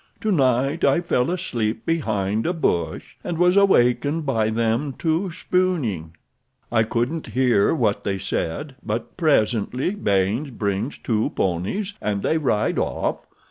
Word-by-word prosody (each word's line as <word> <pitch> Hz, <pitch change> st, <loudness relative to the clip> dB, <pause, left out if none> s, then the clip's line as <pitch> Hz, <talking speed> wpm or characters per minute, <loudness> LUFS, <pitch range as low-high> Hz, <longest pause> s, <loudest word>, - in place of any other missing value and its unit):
Tonight 140 Hz, -, +1 dB
I -, -, +4 dB
fell 165 Hz, -6 st, +1 dB
asleep 120 Hz, -12 st, -2 dB
behind 110 Hz, -9 st, 0 dB
a 175 Hz, -, +1 dB
bush, 85 Hz, -, -2 dB
and 170 Hz, -, -3 dB
was 180 Hz, +2 st, +4 dB
awakened 150 Hz, -5 st, +3 dB
by 115 Hz, -6 st, +1 dB
them 115 Hz, +5 st, 0 dB
two 165 Hz, +4 st, 0 dB
spooning. 155 Hz, -, -1 dB, 0.6 s
I 115 Hz, -1 st, +3 dB
couldn't 120 Hz, +8 st, -1 dB
hear 125 Hz, -2 st, +2 dB
what 110 Hz, -8 st, +1 dB
they 100 Hz, -1 st, -2 dB
said, 130 Hz, -, -3 dB
but 110 Hz, +3 st, -4 dB
presently 130 Hz, -, +1 dB
Baynes 105 Hz, -, 0 dB
brings 105 Hz, +1 st, -2 dB
two 110 Hz, -2 st, 0 dB
ponies 95 Hz, -, -1 dB
and 100 Hz, -2 st, -1 dB
they 160 Hz, -, +1 dB
ride 115 Hz, -8 st, +1 dB
off. -, -, -2 dB
125 Hz, 135 wpm, -23 LUFS, 105-165 Hz, 0.6 s, I